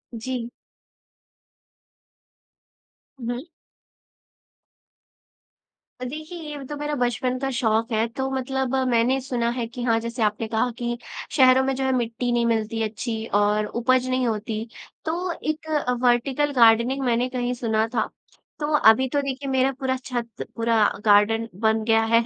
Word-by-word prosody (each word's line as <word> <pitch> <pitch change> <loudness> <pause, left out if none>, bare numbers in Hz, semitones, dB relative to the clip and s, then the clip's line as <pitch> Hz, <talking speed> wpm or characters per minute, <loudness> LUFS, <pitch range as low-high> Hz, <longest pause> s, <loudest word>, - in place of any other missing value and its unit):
जी। 240 +1 -4 2.7
हुँ, 230 - -5
हुँ। 265 +8 -8 2.6
देखिए 310 +6 -7 0.2
ये 280 - -8
तो 295 - -5
मेरा 295 0 -2
बचपन 250 0 0
का 270 0 -1
शौक 230 -2 +1
है 220 0 +2
तो 265 0 -1
मतलब 265 0 -1
मैंने 245 +3 +3
सुना 245 -3 -1
है 240 -1 -2
कि 240 +1 -7
हाँ, 230 -2 +2
जैसे 235 0 -6
कि 235 - -3
आपने 215 +1 -1
कहा 220 +3 0
कि 240 0 -2 0.4
शहरों 260 0 +6
में 270 0 0
जो 265 - -2
है 265 - +1
मिट्टी 240 0 -1
नहीं 235 -1 +2
मिलती 225 -1 0
अच्छी 220 +1 -3
और 210 +1 +3
उपज 255 +3 +1
नहीं 255 -1 +1
होती। 220 0 -3 0.4
तो 350 +3 -1 0.2
एक 310 +1 -3
अ, 290 -5 +1
वर्टीकल 255 +4 +2
गार्डनिंग 235 +2 +4
मैंने 245 +1 +1
कहीं 250 -1 -2
सुना 225 -2 0
था, 220 - +1 0.5
तो 295 - -1
अभी 260 -1 +5
तो 285 +1 +1
देखिए 275 0 -4
मेरा 265 0 +2
पूरा 260 -1 0
छत 235 -3 -4
पूरा 230 0 +1 0.3
गार्डन 215 +2 +4
बन 220 0 +2
गया 225 -1 +4
है 230 +1 +4
240 Hz, 150 wpm, -24 LUFS, 225-265 Hz, 2.7 s, शहरों